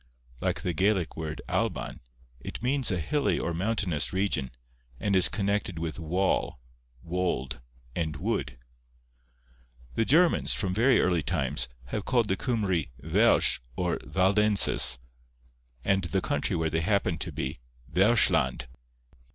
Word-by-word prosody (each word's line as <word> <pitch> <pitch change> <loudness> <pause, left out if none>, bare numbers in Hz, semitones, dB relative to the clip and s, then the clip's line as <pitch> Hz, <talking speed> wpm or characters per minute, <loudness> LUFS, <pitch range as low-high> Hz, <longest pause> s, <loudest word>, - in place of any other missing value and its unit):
Like - - -1
the 90 - -2
Gaelic 95 0 +1
word 80 -1 -5
Alban, - - -2 0.4
it 65 - -8
means 130 0 +2
a 90 -4 0
hilly 140 - 0
or 85 - -2
mountainous 90 -4 -1
region, 95 -9 -1 0.5
and 100 -1 0
is 90 -2 +5
connected 100 -3 -1
with 80 0 -4
wall, 90 -3 -1 0.4
wold, 85 -8 -2 0.3
and 80 -3 -2
wood. 70 - -3 1.4
The 115 - +1
Germans, 165 +8 +3
from 95 -2 -2
very 120 +6 +4
early 90 -2 +2
times, 70 -6 -1 0.2
have 105 - -3
called 120 -4 +1
the 95 - +2
Cymry 95 - -1
Welsh 85 +11 +3 0.2
or 90 -1 -1
Waldenses, 95 -9 +4 0.9
and 95 -2 +2
the 85 - 0
country - - -1
where 80 -1 -1
they 80 +1 0
happened 90 -2 0
to - - -4
be, - - -4 0.3
Welschland. 100 - +2
90 Hz, 130 wpm, -28 LUFS, 80-105 Hz, 1.4 s, is